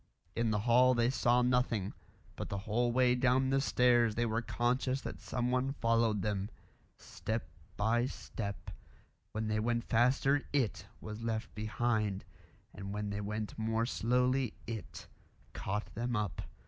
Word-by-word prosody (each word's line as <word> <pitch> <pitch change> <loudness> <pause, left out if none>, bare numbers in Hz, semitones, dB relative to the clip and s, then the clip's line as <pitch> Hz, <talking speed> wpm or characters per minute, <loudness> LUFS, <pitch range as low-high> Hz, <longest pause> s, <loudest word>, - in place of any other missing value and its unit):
In 115 -1 +1
the 105 -1 +1
hall 125 +3 +5
they 120 +1 +3
saw 125 -1 +3
nothing, 125 -5 +1 0.4
but - - -5
the 100 - -2
whole 110 +4 0
way 125 0 +4
down 130 +1 +2
the 135 0 +3
stairs 120 -4 +3
they 120 - +1
were 115 0 0
conscious 125 +3 0
that - - -7
someone 125 +2 0
followed 115 -5 +2
them; 100 -1 -1 0.5
step 110 +1 -4 0.3
by 115 +4 +2
step; 100 -5 -6 0.6
when 110 0 -2
they 110 0 0
went 115 +1 0
faster 135 +4 +3
IT 130 -7 0
was 110 +1 -7
left 115 -1 -3
behind, 110 -2 -1 0.5
and 100 +1 -6
when 105 -1 -2
they 100 0 -3
went 105 +1 -4
more 110 +1 +1
slowly 125 +1 +1
IT 110 -2 -6 0.5
caught 105 +2 -3
them 120 +2 -2
up. 105 -4 -2
115 Hz, 150 wpm, -33 LUFS, 105-125 Hz, 0.6 s, hall